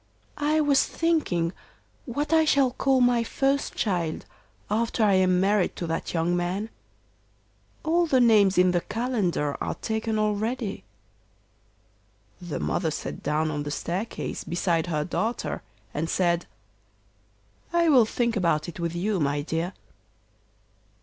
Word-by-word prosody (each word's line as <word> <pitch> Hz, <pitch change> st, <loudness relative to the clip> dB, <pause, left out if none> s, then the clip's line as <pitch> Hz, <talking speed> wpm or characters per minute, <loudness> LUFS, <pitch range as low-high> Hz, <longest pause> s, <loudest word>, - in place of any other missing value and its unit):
'I 300 Hz, +2 st, +2 dB
was 285 Hz, -2 st, +4 dB
thinking 195 Hz, -, 0 dB, 0.5 s
what 290 Hz, +5 st, -2 dB
I 320 Hz, 0 st, +6 dB
shall 280 Hz, -4 st, +3 dB
call 265 Hz, +1 st, +2 dB
my 245 Hz, -1 st, +4 dB
first 275 Hz, +4 st, 0 dB
child 175 Hz, -6 st, -1 dB, 0.4 s
after 225 Hz, +2 st, 0 dB
I 205 Hz, -2 st, +4 dB
am 185 Hz, -1 st, +3 dB
married 195 Hz, 0 st, +2 dB
to 175 Hz, -, -4 dB
that 165 Hz, 0 st, -3 dB
young 170 Hz, +2 st, +1 dB
man. 185 Hz, +5 st, -2 dB, 1.1 s
All 340 Hz, +2 st, +2 dB
the 265 Hz, -4 st, +3 dB
names 210 Hz, -6 st, +5 dB
in 180 Hz, 0 st, +5 dB
the 175 Hz, -1 st, +1 dB
calendar 205 Hz, -, -1 dB
are -, -, -2 dB
taken 220 Hz, 0 st, -2 dB
already.' 215 Hz, +1 st, -1 dB, 1.6 s
The 175 Hz, -3 st, -4 dB
mother 170 Hz, -2 st, 0 dB
sat 155 Hz, -, -5 dB
down 155 Hz, +2 st, 0 dB
on 145 Hz, -1 st, -3 dB
the 145 Hz, -, -4 dB
staircase 175 Hz, +8 st, -4 dB
beside 170 Hz, -1 st, 0 dB
her 155 Hz, -3 st, -1 dB
daughter 215 Hz, +8 st, -2 dB, 0.3 s
and 160 Hz, +2 st, -2 dB
said, 175 Hz, -2 st, +1 dB, 1.2 s
'I 340 Hz, -1 st, +3 dB
will 255 Hz, -6 st, +6 dB
think 235 Hz, +1 st, -1 dB
about 165 Hz, -6 st, +1 dB
it 175 Hz, -, -8 dB
with 170 Hz, 0 st, -2 dB
you, 195 Hz, +3 st, 0 dB
my 145 Hz, -1 st, 0 dB
dear. 165 Hz, +3 st, -2 dB
200 Hz, 135 wpm, -26 LUFS, 170-245 Hz, 1.6 s, I